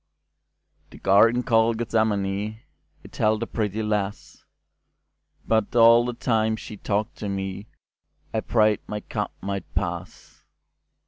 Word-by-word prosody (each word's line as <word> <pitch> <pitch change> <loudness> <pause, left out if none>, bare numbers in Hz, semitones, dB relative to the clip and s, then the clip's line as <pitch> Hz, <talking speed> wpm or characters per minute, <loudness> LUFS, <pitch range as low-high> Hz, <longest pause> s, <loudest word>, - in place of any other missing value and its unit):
The - - -14
Garden 115 +5 +4
called 115 -1 +3
Gethsemane, 110 -2 -1 0.4
It - - -14
held 110 +1 +2
a - - -1
pretty 110 -1 -2
lass, 105 -2 -3 1.0
But 110 -1 +1
all 115 0 +7
the 125 - -2
time 110 -2 +1
she 110 0 -9
talked 105 +1 -2
to 105 - -5
meI 95 +1 -4 0.8
prayed 110 -2 +3
my 105 0 -4
cup - - -4
might 100 0 -4
pass. - - -5
110 Hz, 120 wpm, -24 LUFS, 100-115 Hz, 1.0 s, all